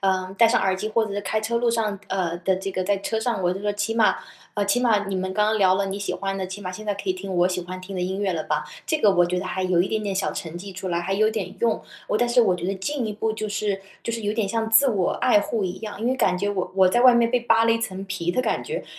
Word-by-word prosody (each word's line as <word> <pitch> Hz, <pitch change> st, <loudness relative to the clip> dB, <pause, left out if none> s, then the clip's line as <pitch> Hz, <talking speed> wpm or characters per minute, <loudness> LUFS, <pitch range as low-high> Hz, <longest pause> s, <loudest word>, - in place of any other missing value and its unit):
呃， 190 Hz, -1 st, 0 dB
戴 230 Hz, -, +7 dB
上 240 Hz, +2 st, +3 dB
耳 190 Hz, -1 st, +1 dB
机 210 Hz, +3 st, -3 dB
或 225 Hz, 0 st, +2 dB
者 200 Hz, -, -5 dB
是 205 Hz, -, -1 dB
开 215 Hz, +1 st, -1 dB
车 235 Hz, +2 st, -1 dB
路 235 Hz, 0 st, +2 dB
上 215 Hz, -3 st, -1 dB
呃， 175 Hz, -3 st, -1 dB
的 185 Hz, +1 st, +1 dB
这 195 Hz, +1 st, -4 dB
个 185 Hz, 0 st, -2 dB
在 200 Hz, 0 st, +1 dB
车 220 Hz, +3 st, -2 dB
上 220 Hz, -4 st, -1 dB
我 175 Hz, 0 st, +2 dB
就 190 Hz, -, -5 dB
说 205 Hz, 0 st, -1 dB
起 205 Hz, +2 st, -2 dB
码 225 Hz, -1 st, +4 dB, 0.4 s
呃， 205 Hz, -, 0 dB
起 245 Hz, +5 st, +2 dB
码 215 Hz, -4 st, +2 dB
你 195 Hz, -1 st, -2 dB
们 185 Hz, 0 st, -2 dB
刚 210 Hz, +2 st, +2 dB
刚 215 Hz, 0 st, +1 dB
聊 185 Hz, -1 st, +4 dB
了 200 Hz, 0 st, 0 dB
你 195 Hz, +1 st, -4 dB
喜 200 Hz, -, -3 dB
欢 195 Hz, 0 st, -3 dB
的， 190 Hz, -1 st, -3 dB
起 190 Hz, +2 st, -7 dB
码 185 Hz, -2 st, -5 dB
现 215 Hz, +4 st, -8 dB
在 205 Hz, -, -1 dB
可 200 Hz, -1 st, -7 dB
以 -, -, +3 dB
听 190 Hz, +1 st, -6 dB
我 175 Hz, +1 st, +3 dB
喜 180 Hz, -1 st, -2 dB
欢 185 Hz, +1 st, -7 dB
听 190 Hz, +1 st, -7 dB
的 180 Hz, -, -1 dB
音 190 Hz, +2 st, -2 dB
乐 195 Hz, -2 st, 0 dB
了 155 Hz, -, -3 dB
吧。 150 Hz, 0 st, -1 dB, 0.2 s
这 315 Hz, -, +1 dB
个 210 Hz, -, +5 dB
我 175 Hz, -2 st, +4 dB
觉 180 Hz, +1 st, -1 dB
得 180 Hz, -, -4 dB
还 190 Hz, -, -2 dB
有 180 Hz, -2 st, +2 dB
一 185 Hz, -, +1 dB
点 220 Hz, -1 st, -1 dB
点 200 Hz, -2 st, -2 dB
小 190 Hz, -, -1 dB
成 170 Hz, 0 st, -6 dB
绩 195 Hz, +1 st, -8 dB
出 185 Hz, 0 st, -5 dB
来， 170 Hz, -1 st, 0 dB
还 190 Hz, +3 st, -2 dB
有 215 Hz, +2 st, +3 dB
点 195 Hz, -4 st, -4 dB
用， 230 Hz, -1 st, +1 dB, 0.3 s
我 210 Hz, -, +1 dB
但 240 Hz, -, +2 dB
是 240 Hz, 0 st, +5 dB
我 185 Hz, -, +3 dB
觉 175 Hz, 0 st, -4 dB
得 195 Hz, -, -1 dB
进 245 Hz, +5 st, -2 dB
一 210 Hz, -, -3 dB
步 220 Hz, +1 st, -1 dB
就 215 Hz, -1 st, -4 dB
是， 200 Hz, -1 st, -2 dB, 0.2 s
就 230 Hz, -, -3 dB
是 230 Hz, -, -3 dB
有 205 Hz, -, 0 dB
点 215 Hz, -2 st, 0 dB
像 225 Hz, +2 st, -1 dB
自 270 Hz, +5 st, +6 dB
我 200 Hz, -7 st, +1 dB
爱 245 Hz, -5 st, +3 dB
护 210 Hz, 0 st, -2 dB
一 185 Hz, +2 st, -4 dB
样， 210 Hz, -2 st, -6 dB
因 230 Hz, -, -1 dB
为 260 Hz, -, +2 dB
感 180 Hz, -8 st, +2 dB
觉 200 Hz, +2 st, -1 dB
我 190 Hz, -3 st, -2 dB
我 190 Hz, -1 st, +5 dB
在 240 Hz, +6 st, +2 dB
外 250 Hz, -1 st, +7 dB
面 235 Hz, -1 st, +3 dB
被 250 Hz, -1 st, +2 dB
扒 225 Hz, -1 st, +3 dB
了 230 Hz, -, +4 dB
一 230 Hz, -, +1 dB
层 195 Hz, -3 st, -4 dB
皮 190 Hz, -3 st, -2 dB
的 255 Hz, -, 0 dB
感 225 Hz, -, -1 dB
觉。 470 Hz, +3 st, -5 dB
200 Hz, 355 characters per minute, -24 LUFS, 185-225 Hz, 0.4 s, 戴